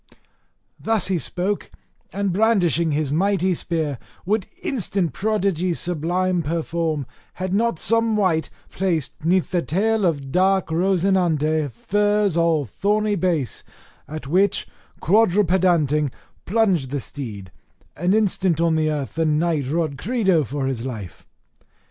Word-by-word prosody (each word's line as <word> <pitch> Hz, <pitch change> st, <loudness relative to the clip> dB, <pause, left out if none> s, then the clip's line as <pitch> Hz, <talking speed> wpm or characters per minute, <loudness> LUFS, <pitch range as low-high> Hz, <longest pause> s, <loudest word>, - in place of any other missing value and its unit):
Thus 220 Hz, -4 st, +1 dB
he 185 Hz, -3 st, +1 dB
spoke, 190 Hz, +6 st, -2 dB, 0.4 s
and 200 Hz, -2 st, -1 dB
brandishing 180 Hz, -, +2 dB
his 145 Hz, -1 st, -1 dB
mighty 190 Hz, +2 st, +2 dB
spear, 155 Hz, -6 st, -2 dB, 0.3 s
would 205 Hz, +1 st, 0 dB, 0.2 s
instant 195 Hz, -, -1 dB
prodigies 190 Hz, -5 st, 0 dB
sublime 180 Hz, +2 st, 0 dB
perform, 165 Hz, -1 st, -2 dB, 0.3 s
had 185 Hz, 0 st, -4 dB
not 230 Hz, -1 st, +1 dB
some 230 Hz, +3 st, +2 dB
wight 165 Hz, -7 st, +1 dB, 0.2 s
placed 170 Hz, -7 st, -2 dB
'neath 180 Hz, +2 st, +1 dB
the 175 Hz, -1 st, +1 dB
tail 210 Hz, +7 st, 0 dB
of 145 Hz, -6 st, 0 dB
dark 190 Hz, +1 st, +2 dB
Rosinante 165 Hz, -4 st, +1 dB
furze 205 Hz, -, +1 dB
all 165 Hz, -3 st, +2 dB
thorny 210 Hz, -, 0 dB
base; 170 Hz, -, -1 dB, 0.4 s
at 155 Hz, 0 st, -7 dB
which, 185 Hz, +7 st, +1 dB, 0.3 s
quadrupedanting, 175 Hz, -, +3 dB, 0.4 s
plunged 190 Hz, -, +2 dB
the 140 Hz, +1 st, -2 dB
steed, 105 Hz, -9 st, -7 dB, 0.4 s
and 180 Hz, +6 st, +1 dB
instant 190 Hz, -6 st, +1 dB
on 170 Hz, -1 st, +2 dB
the 155 Hz, -1 st, +1 dB
earth 145 Hz, -3 st, -3 dB
the 165 Hz, 0 st, 0 dB
knight 155 Hz, -2 st, +1 dB
roared 155 Hz, -1 st, -1 dB
credo 195 Hz, -8 st, +2 dB
for 135 Hz, +2 st, -3 dB
his 130 Hz, -3 st, -2 dB
life. 110 Hz, -9 st, -7 dB
175 Hz, 125 wpm, -22 LUFS, 155-195 Hz, 0.4 s, quadrupedanting